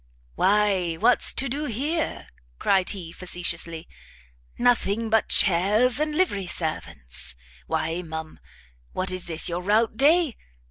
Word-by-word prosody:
"Why 195 - +1
what's 240 +9 +3
to 275 - 0
do 285 +4 -3
here?" 295 +7 -2 0.3
cried 190 - +2
he, 180 -5 -5
facetiously, 170 -2 -3 0.7
"nothing 230 -2 +1
but 220 -1 +2
chairs 210 +8 +2
and 305 0 -1
livery 205 - 0
servants! 80 - -6 0.3
Why, 160 +2 -2
ma'am, 160 -2 -8 0.5
what 185 0 -1
is 185 -1 -4
this 165 -2 +2
your 175 +1 -2
rout 215 +4 +1
day? 305 0 +3
195 Hz, 125 wpm, -24 LUFS, 165-240 Hz, 0.7 s, what's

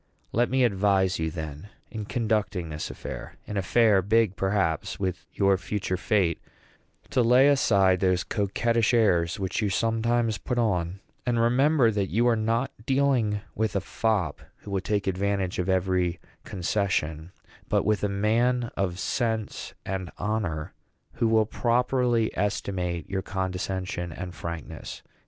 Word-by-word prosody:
Let 120 +2 +2
me 130 0 +2
advise 95 -4 +2
you, 80 0 0
then, 80 +2 -7 0.2
in 110 -2 -5
conducting 105 -7 -1
this 75 0 -4
affair, 60 0 -7
an 105 - -6
affair 100 +1 +4
big, 105 0 +2
perhaps, 95 -4 0
with 90 -4 -3
your 100 -2 +2
future 95 -2 -2
fate, 90 -3 +1 0.7
to 125 - +3
lay 125 +4 +6
aside 100 -9 +4
those 90 -1 +2
coquettish 115 +3 +1
airs 90 -4 +2
which 95 +3 -1
you 105 - +1
sometimes 115 +1 +1
put 125 - -3
on; 95 -5 0 0.2
and 120 -2 0
remember 125 +2 +4
that 100 -2 -1
you 120 +3 +2
are 120 - +4
not 115 +4 0
dealing 130 -6 +1
with 110 0 -1
a - - +3
fop, 95 -4 -1 0.2
who 100 - -8
will 95 -1 0
take 100 +1 -1
advantage 95 -1 -1
of 90 +1 -1
every 90 -2 +1 0.3
concession, 90 -4 -1 0.4
but - - +2
with 105 -1 +1
a 105 - +2
man 115 +4 +1
of 90 -3 -1
sense 110 +1 -2
and 95 -2 -3
honor, 100 -8 -2 0.4
who 115 - +1
will 110 -1 +4
properly 120 0 +1
estimate 90 -4 -2
your 95 -1 -2
condescension 95 -2 -3
and 90 +2 -6
frankness. 85 -2 -7
100 Hz, 145 wpm, -26 LUFS, 90-115 Hz, 0.7 s, lay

